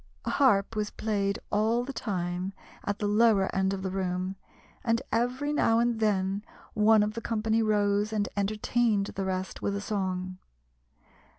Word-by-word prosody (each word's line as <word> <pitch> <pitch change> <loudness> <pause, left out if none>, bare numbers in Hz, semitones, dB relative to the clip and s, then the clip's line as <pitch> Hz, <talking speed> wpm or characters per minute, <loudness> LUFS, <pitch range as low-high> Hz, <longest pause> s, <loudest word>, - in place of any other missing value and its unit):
A - - -1
harp 225 -6 +3
was 210 -1 -1
played 200 -2 -1
all 220 +3 +2
the 275 +2 -6
time 180 -3 -3 0.3
at 205 0 -2
the 210 - -2
lower 210 -2 +3
end 190 0 +2
of 195 -1 -3
the 190 - -2
room, 185 0 -2 0.5
and 230 -2 +2
every 255 +5 0
now 225 -6 +3
and 235 -1 +1
then 200 -2 +1 0.3
one 215 0 +5
of 210 +1 -1
the 230 - -5
company 225 0 0
rose 205 -1 +2
and 210 -2 0
entertained 210 +1 +1
the 195 - -3
rest 185 0 -3
with 200 - -1
a - - -2
song. 185 -3 -3
205 Hz, 165 wpm, -28 LUFS, 195-225 Hz, 0.5 s, one